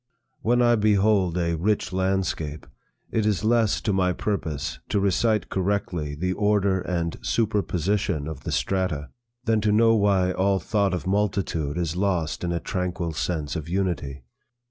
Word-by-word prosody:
When 120 +2 +3
I 120 0 +5
behold 100 -4 +3
a 85 -1 0
rich 100 +4 0
landscape, 95 -5 -1 0.5
it 110 - +1
is 105 -2 0
less 115 -2 +3
to 105 - 0
my 90 -1 +2
purpose 80 -11 -3
to 100 - +1
recite 105 +2 +1
correctly 90 -6 -1
the 90 +4 -1
order 100 -2 +2
and 85 -2 -2
superposition 100 -6 0
of 80 -3 -6
the - - -4
strata, 90 -7 -1 0.3
than 115 -3 +2
to 105 0 +2
know 115 +2 +5
why 100 -4 +3
all 95 +1 +2
thought 100 +1 0
of 85 - -5
multitude 95 -6 0
is 85 -2 -1
lost 90 -5 -1
in 85 - -1
a 85 - -1
tranquil 90 -2 -3
sense 80 -1 -2
of 80 -1 -5
unity. 85 -8 -2
95 Hz, 155 wpm, -25 LUFS, 85-105 Hz, 0.5 s, I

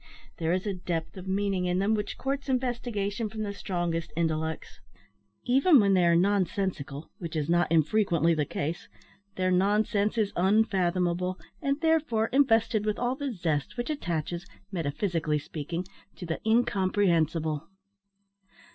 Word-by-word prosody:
There 165 0 0
is 185 +2 0
a 205 - -1
depth 170 -3 -4
of 190 0 -9
meaning 195 -1 0
in 180 0 +1
them 200 +3 +2
which 210 -1 -2
courts 275 +1 -3
investigation 240 -4 -1
from 215 0 -4
the 200 -1 -3
strongest 170 -5 -2
intellects. 160 -1 -2 0.7
Even 275 +5 +5
when 200 -2 +4
they 180 -2 +4
are 170 0 +5
nonsensical, 185 -6 0
which 165 -2 -6
is 150 -2 -1
not 175 +1 +2
unfrequently 170 0 +3
the 155 -2 +1
case, 160 +4 -3 0.5
their 185 0 +1
nonsense 205 +3 +2
is 210 -3 +1
unfathomable, 185 -2 +1 0.2
and, 275 +1 0
therefore, 310 -9 +2
invested 225 -5 +3
with 215 0 -1
all 245 +1 0
the 280 -1 -3
zest 165 - -2
which 240 +5 -2
attaches, 175 - -3 0.2
metaphysically 165 -1 -1
speaking, 160 +4 -5 0.3
to 180 - -7
the 160 -1 -3
incomprehensible. 180 -8 +1
190 Hz, 140 wpm, -28 LUFS, 170-220 Hz, 0.7 s, Even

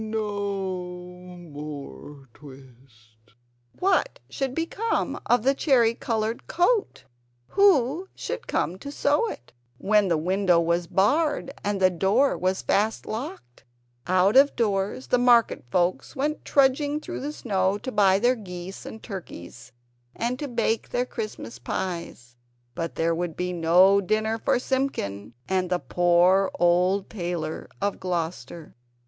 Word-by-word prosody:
no 200 -4 -3 0.3
more 145 -3 -9
twist!" 120 -5 -18 0.4
What 375 0 +1
should 265 -1 -3
become 400 +7 -2
of 240 -2 +3
the 270 +2 +4
cherry 250 -5 +3
coloured 225 -1 -3
coat? 400 +5 +1 0.5
Who 360 -3 +3
should - - -5
come 180 +2 -1
to 280 - -7
sew 295 +10 +1
it, 120 - -10 0.2
when 210 - +2
the 170 -3 +2
window 180 +2 +2
was 170 +1 0
barred, 280 - +1
and 205 -1 -1
the 185 -1 +4
door 200 +10 +2
was 185 +1 -1
fast 215 +2 0
locked? 195 - -7 0.4
Out 185 +4 +3
of 280 +2 +6
doors 205 +1 -1
the 250 - +2
market 240 - +3
folks 180 - 0
went 295 +3 -2
trudging 285 +2 +2
through - - -6
the 290 +2 -4
snow 195 -8 0
to 260 +5 -6
buy 195 -3 +4
their 240 +5 +3
geese 185 -4 -8
and 220 - -9
turkeys, 170 - -9 0.4
and 245 +2 -2
to 290 - -3
bake 230 -3 -1
their 245 - 0
Christmas 215 - -6
pies; 125 -3 -5 0.4
but 165 +5 -4
there 165 +1 +1
would 170 -1 -3
be 180 0 -2
no 180 +4 +5
dinner 215 +3 0
for - - +1
Simpkin 240 - -3
and 185 -1 0
the 180 - +1
poor 175 +6 +3
old 180 +3 +2
tailor 175 -5 -4
of 200 0 -2
Gloucester. 170 -2 -4
195 Hz, 135 wpm, -25 LUFS, 175-245 Hz, 0.5 s, of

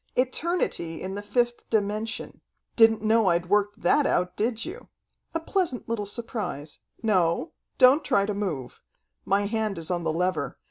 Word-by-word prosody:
"Eternity 255 - 0
in 190 +1 -5
the 205 - -4
fifth 240 +3 -1
dimension. 215 +1 -2 0.3
Didn't 225 -1 +5
know 220 -1 +3
I'd 170 0 +1
worked 205 +1 +1
that 290 - +4
out, 180 0 0
did 225 +1 -1
you? - - -9 0.5
A - - +2
pleasant 325 -6 -1
little 220 -3 -2
surprise. 200 - -5 0.2
No, 180 -6 +1 0.3
don't 265 +4 +6
try 200 -7 +2
to 210 - -2
move. 160 - -4 0.4
My 200 +1 +2
hand 215 -2 -1
is 165 +1 -5
on 175 -1 -1
the 160 - 0
lever. 180 +3 -1
210 Hz, 155 wpm, -26 LUFS, 180-230 Hz, 0.5 s, don't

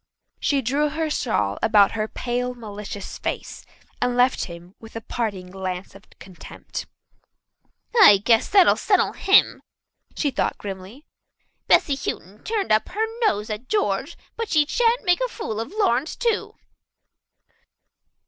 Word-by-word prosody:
She 275 -2 +1
drew 285 +5 +1
her 315 +1 -2
shawl 105 - -1
about 205 -2 +5
her 215 -1 -2
pale, 250 +2 -3
malicious 210 -3 -8
face - - -5 0.4
and 245 0 0
left 250 +1 +3
him 170 +1 -11
with 225 0 -14
a 225 - -4
parting 200 -7 -4
glance 185 -1 -5
of 195 +2 -17
contempt. 185 -2 -9 1.1
"I 305 - +8
guess 225 +3 +2
that'll 390 -3 +5
settle - - +2
him," 390 +2 +3 0.5
she 290 - 0
thought 260 - -1
grimly. 200 - -9 0.6
"Bessy 285 - +4
Houghton 210 -6 -6
turned 430 -3 -2
up 215 0 +2
her 430 +4 -1 0.2
nose 210 +1 -1
at 215 +4 -6
George, 420 -1 -1 0.2
but 460 -1 -4
she 305 -2 +3
shan't 470 +6 +1
make 355 +2 +3
a - - +1
fool 220 - -5
of 225 - -4
Lawrence 315 - 0
too." 465 -3 -1
240 Hz, 140 wpm, -23 LUFS, 205-315 Hz, 1.1 s, I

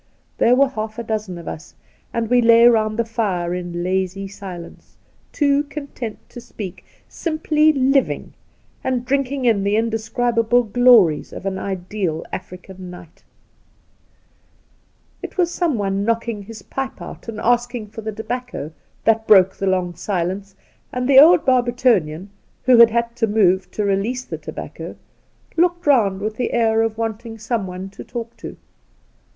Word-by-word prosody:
There 245 - +5
were 275 +1 +4
half 215 -3 -5
a 235 - -4
dozen 215 -5 -3
of 170 - -10
us, 80 0 -8 0.4
and 230 -1 -1
we 245 +2 +4
lay 230 0 +7
round 215 -2 +2
the 235 - +1
fire 195 -7 -1
in 175 -1 -4
lazy 190 +1 -1
silence, 190 -4 -10 0.3
too 285 -1 +2
content 280 -6 -7
to 240 - -10
speak, 205 -6 -8 0.2
simply 310 -1 +1
living 275 -1 +1 0.5
and 250 -2 -1
drinking 275 0 -1
in 220 -4 +3
the 200 +1 +1
indescribable 230 +1 +1
glories 220 -8 +4
of - - -9
an 190 -1 -2
ideal 185 -3 -3
African 185 0 -8
night. 175 -2 -13 2.0
The - - -4
Outspan - - -22
It - - -27
was 350 -2 +2
someone 205 - -1
knocking 230 -1 -1
his 215 0 -11
pipe 270 0 -5
out - - -10
and 220 -2 -6
asking 240 -1 0
for 220 +1 -8
the 220 0 -4
tobacco 230 - -5 0.3
that 225 0 +2
broke 190 -3 +6
the 195 - -3
long 185 -2 0
silence, 190 +2 -3 0.4
and 250 0 -2
the 270 -1 +8
old 320 +3 +7
Barbertonian, 240 - +2 0.3
who 255 -1 +5
had 235 -1 +9
had 235 +1 -1
to 225 -2 +1
move 190 -3 +2
to 210 - -2
release 210 +6 -1
the - - -6
tobacco, - - -8 0.6
looked 350 +1 +2
round 210 -9 +3
with 215 +1 -3
the 245 - -2
air 225 -1 +3
of 225 -1 -1
wanting 225 0 -4
someone 195 -5 -4
to - - -10
talk 235 -1 -7
to. - - -9
225 Hz, 155 wpm, -20 LUFS, 195-245 Hz, 2.0 s, had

